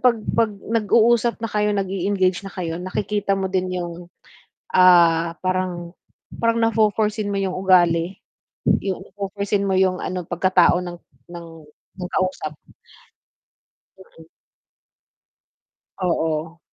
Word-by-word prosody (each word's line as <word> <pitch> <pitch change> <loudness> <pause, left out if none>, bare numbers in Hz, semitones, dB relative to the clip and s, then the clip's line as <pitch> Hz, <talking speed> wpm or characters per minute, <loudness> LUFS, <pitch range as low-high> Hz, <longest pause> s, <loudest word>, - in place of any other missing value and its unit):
'pag 250 -2 +4 0.2
'pag 230 -1 +2
nag 225 -1 -1
uusap 235 +1 +4
na 225 - -2
kayo 210 0 +1
nag-e-engage 190 -1 0
na 195 - -8
kayo, 165 -3 -4
nakikita 200 +2 -1
mo 190 -1 -2
din 185 -1 0
yung, 175 0 -6 0.7
ah, 170 -2 +5
parang 185 -2 -2 0.5
parang 230 0 +2
na 225 0 +2
fo-for 215 -1 +3
seen 210 -2 -3
mo 200 - -1
yung 190 -2 -2
ugali, 180 -1 +2 0.7
yung 190 -2 -3
na - - -16
fo-for 200 0 -5
seen 200 0 +1
mo 190 - +1
yung 185 -1 +2
ano 185 0 -4
pagkatao 175 0 +3
ng 175 -1 -7 0.3
ng 170 -1 -8 0.5
ng 180 -1 -5
kausap. 185 -5 -2 1.4
Mm. - - -17 1.7
Oo. 165 -2 -1
185 Hz, 130 wpm, -22 LUFS, 175-205 Hz, 1.7 s, ah